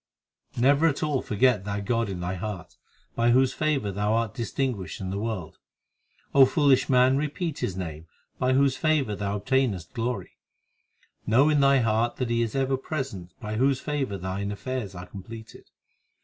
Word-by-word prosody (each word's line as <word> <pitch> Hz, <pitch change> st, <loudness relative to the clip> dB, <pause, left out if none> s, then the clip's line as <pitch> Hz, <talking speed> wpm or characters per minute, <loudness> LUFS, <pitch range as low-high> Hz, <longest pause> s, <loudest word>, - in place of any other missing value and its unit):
7 120 Hz, -, -2 dB
Never 145 Hz, +4 st, +5 dB
at 145 Hz, -2 st, -1 dB
all 145 Hz, -4 st, 0 dB
forget 110 Hz, -1 st, +2 dB
that 100 Hz, 0 st, -4 dB
God 115 Hz, -1 st, 0 dB
in 90 Hz, -2 st, -5 dB
thy 90 Hz, +1 st, -2 dB
heart 95 Hz, -1 st, -6 dB, 0.4 s
By 120 Hz, 0 st, +2 dB
whose 130 Hz, +2 st, +4 dB
favour 145 Hz, -9 st, 0 dB
thou 105 Hz, +2 st, 0 dB
art 115 Hz, -3 st, 0 dB
distinguished 120 Hz, -4 st, -3 dB
in 95 Hz, -1 st, -4 dB
the 100 Hz, -, -3 dB
world, 105 Hz, -6 st, -4 dB, 0.7 s
O 135 Hz, -, +8 dB
foolish 140 Hz, -4 st, +3 dB
man, 130 Hz, 0 st, +4 dB
repeat 150 Hz, +2 st, -3 dB
His 95 Hz, -, -3 dB
name 80 Hz, -3 st, -6 dB, 0.3 s
By 130 Hz, 0 st, +2 dB
whose 135 Hz, 0 st, +3 dB
favour 135 Hz, -6 st, +1 dB
thou 100 Hz, 0 st, -2 dB
obtainest 105 Hz, -7 st, 0 dB
glory. 115 Hz, -5 st, -4 dB, 0.9 s
Know 130 Hz, +7 st, +5 dB
in 150 Hz, -1 st, +3 dB
thy 140 Hz, -1 st, +5 dB
heart 115 Hz, +1 st, +1 dB
that 125 Hz, -2 st, -2 dB
He 115 Hz, 0 st, +2 dB
is 115 Hz, 0 st, -2 dB
ever 135 Hz, 0 st, +1 dB
present 130 Hz, -, -5 dB
By 110 Hz, -3 st, -4 dB
whose 135 Hz, +2 st, +2 dB
favour 140 Hz, -10 st, -2 dB
thine 95 Hz, +2 st, -3 dB
affairs 110 Hz, -2 st, -4 dB
are 90 Hz, 0 st, -7 dB
completed. 110 Hz, +4 st, -11 dB
115 Hz, 175 wpm, -26 LUFS, 100-135 Hz, 0.9 s, O